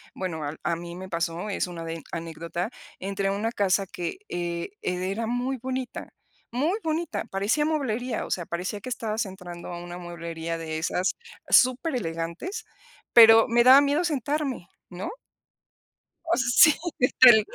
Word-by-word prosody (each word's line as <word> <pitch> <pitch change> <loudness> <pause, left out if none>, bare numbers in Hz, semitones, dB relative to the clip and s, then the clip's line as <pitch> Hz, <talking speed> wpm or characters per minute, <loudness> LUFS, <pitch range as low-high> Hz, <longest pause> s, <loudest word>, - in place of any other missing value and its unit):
bueno, 170 -5 -4
al 145 +2 -4
a 170 +2 0
mí 170 +1 -8
me 190 +1 -8
pasó, 170 +3 -2
es 190 - -1
1 170 -2 -7
de 165 0 -5
anécdota 170 +4 -4 0.3
entré 195 +1 -2
una 205 +3 -1
casa 195 -3 +1
que, 180 - -5
eh, 170 -1 -3
era 190 +5 -2
muy 245 +3 -1
bonita, 260 -1 -4 0.4
muy 305 - 0
bonita, 315 -9 -2
parecía 200 +10 +1
mueblería, 255 -6 -1
o - - -9
sea, 175 - -1
parecía 185 +4 -4
que - - -6
estabas 225 -2 -2
entrando 180 -2 -9
a 175 - -5
una 175 0 -7
mueblería 170 -1 -5
de 160 -1 -4
esas 180 +3 0 0.3
superelegantes, 250 - +1 0.5
pero 225 -1 +9
me 235 +1 +4
daba 260 +3 +9
miedo 285 +4 +1
sentarme, 285 - -2 0.2
¿no? 180 - -5 1.1
Oh, 335 +1 +2
sí 255 +5 +6 0.3
que 250 - +4
tal, 240 -4 +10
200 Hz, 150 wpm, -26 LUFS, 175-255 Hz, 1.1 s, tal